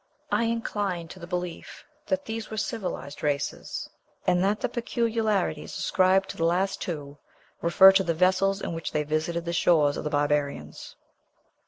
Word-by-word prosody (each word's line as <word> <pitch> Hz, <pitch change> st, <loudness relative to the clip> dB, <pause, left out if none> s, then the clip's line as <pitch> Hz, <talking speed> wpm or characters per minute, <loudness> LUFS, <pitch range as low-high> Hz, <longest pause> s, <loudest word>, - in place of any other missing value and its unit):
I 230 Hz, -, +2 dB
incline 205 Hz, -7 st, -2 dB
to 185 Hz, -, -10 dB
the 170 Hz, -, -9 dB
belief 180 Hz, -1 st, -5 dB, 0.2 s
that 285 Hz, 0 st, -1 dB
these 225 Hz, 0 st, -5 dB
were 220 Hz, -, -6 dB
civilized 190 Hz, -, -4 dB
races, 145 Hz, -1 st, -2 dB, 0.4 s
and 180 Hz, +1 st, +3 dB
that 205 Hz, +2 st, +1 dB
the 250 Hz, -, +1 dB
peculiarities 225 Hz, -8 st, -1 dB
ascribed 190 Hz, +1 st, +3 dB
to -, -, -7 dB
the 165 Hz, -, -1 dB
last 190 Hz, +4 st, +1 dB
two 145 Hz, -4 st, -5 dB, 0.4 s
refer 190 Hz, +3 st, +8 dB
to 195 Hz, 0 st, +3 dB
the 170 Hz, -3 st, -1 dB
vessels 190 Hz, +3 st, +2 dB
in -, -, -3 dB
which 165 Hz, 0 st, -5 dB
they 150 Hz, -, +1 dB
visited 160 Hz, +3 st, -2 dB
the 170 Hz, -, -2 dB
shores 155 Hz, -4 st, +3 dB
of -, -, -4 dB
the 150 Hz, -, -2 dB
barbarians. 145 Hz, -, -1 dB
180 Hz, 165 wpm, -27 LUFS, 155-205 Hz, 0.4 s, refer